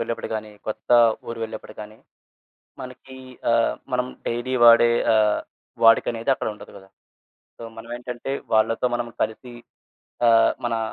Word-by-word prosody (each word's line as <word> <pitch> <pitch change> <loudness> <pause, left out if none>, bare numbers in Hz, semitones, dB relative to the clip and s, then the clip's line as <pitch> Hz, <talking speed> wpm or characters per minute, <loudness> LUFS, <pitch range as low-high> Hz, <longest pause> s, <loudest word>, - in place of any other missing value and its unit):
వెళ్ళేప్పుడు 115 0 -4
గానీ, 110 0 -5 0.2
కొత్తా 110 +2 +1 0.3
ఊరు 115 0 -6
వెళ్ళేప్పుడు 110 -1 -7
గానీ, 105 +1 -10 0.9
మనకీ 130 +1 -11 0.3
ఆహ్, 115 0 +2 0.2
మనం 125 0 0 0.2
డైలీ 120 +2 -3
వాడే 120 0 +7 0.2
ఆహ్, 105 -1 +2 0.4
వాడుకనేది 115 +2 +3
అక్కడుండదు 105 -5 -6
గదా! 95 0 -17 0.7
సో, - - -12
మనవేంటంటే, 120 +2 -7 0.2
వాళ్ళతో 110 +2 +2
మనము 120 0 -3
కలిసి 110 +3 -4 0.8
ఆహ్, 115 -1 +5
మనా 115 -1 -1
115 Hz, 120 wpm, -23 LUFS, 110-120 Hz, 0.9 s, వాడే